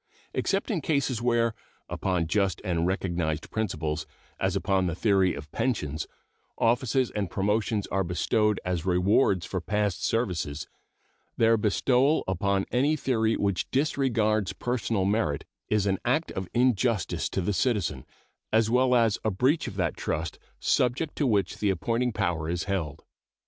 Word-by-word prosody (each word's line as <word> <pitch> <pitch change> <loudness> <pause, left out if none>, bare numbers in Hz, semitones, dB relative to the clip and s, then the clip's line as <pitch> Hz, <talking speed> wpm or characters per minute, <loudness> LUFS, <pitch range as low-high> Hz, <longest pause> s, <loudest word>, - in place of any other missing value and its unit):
Except 195 +4 0
in 180 -7 -1
cases 140 -6 0
where, 120 -1 +2 0.3
upon 90 -3 -1
just 95 +1 +1
and 85 -1 0
recognized 85 -5 -2
principles 80 -8 -2 0.3
as 95 0 0
upon 95 -1 +1
the 85 - -2
theory 95 -2 +2
of 75 -1 -9
pensions 80 - -2 0.5
offices 125 +2 +2
and 100 -4 -2
promotions 105 +2 0
are 95 +1 +1
bestowed 105 +4 +1
as 90 -3 -1
rewards 95 +1 +2
for 95 - -3
past 105 0 -1
services, 85 -10 -1 0.7
their 115 0 +5
bestowal 125 +7 +2
upon 95 +1 0
any 140 +5 +2
theory 115 -6 +1
which 100 -4 -1
disregards 115 - +1
personal 115 -5 -1
merit 95 -8 0 0.2
is 105 -2 +2
an 95 -1 +1
act 135 +7 +1
of 95 -2 -5
injustice 115 -8 +1
to - - -2
the 95 +3 0
citizen, 95 - 0 0.5
as 110 0 +3
well 125 +1 +4
as 115 -3 +3
a 110 - +2
breach 130 - +1
of - - -6
that 90 -4 -1
trust 80 -1 -3 0.2
subject 125 +5 +1
to 145 - +1
which 105 -5 +1
the 105 - +1
appointing 115 +7 0
power 85 -6 -1
is 85 -1 -1
held. 90 -8 -3
105 Hz, 150 wpm, -27 LUFS, 90-120 Hz, 0.7 s, their